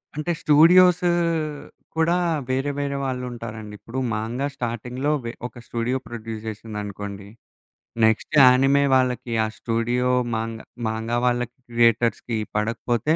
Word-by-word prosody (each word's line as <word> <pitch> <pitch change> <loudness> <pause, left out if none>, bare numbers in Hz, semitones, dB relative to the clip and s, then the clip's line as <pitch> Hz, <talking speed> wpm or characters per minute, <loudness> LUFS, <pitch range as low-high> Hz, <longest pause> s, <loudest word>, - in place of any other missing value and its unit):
అంటే 155 +3 -2
స్టూడియోస్ 180 +4 +6 0.9
కూడా 165 +2 +2 0.3
వేరే 135 +2 0
వేరే 140 -1 -2
వాళ్ళుంటారండి. 120 -4 -5
ఇప్పుడు 125 +3 -6
'మాంగా' 115 +6 -2
స్టార్టింగ్‌లో 125 +3 -3
వె 115 - -3 0.2
ఒక - - -19
స్టూడియో 120 +2 -1
ప్రొడ్యూస్ 115 -2 -6
చేసిందనుకోండి. 105 -2 -6 0.8
నెక్స్ట్ 110 +7 +1
యానిమే 135 +2 +5
వాళ్ళకి 125 -2 0
ఆ - - -1
స్టూడియో 120 +2 0 0.2
'మాంగ-' 110 0 -4 0.2
'మాంగా' 110 +2 -2
వాళ్ళకి 125 -1 0
క్రియేటర్స్‌కి 115 0 +2 0.2
పడకపోతే 115 +6 0
120 Hz, 110 wpm, -23 LUFS, 115-130 Hz, 0.9 s, స్టూడియోస్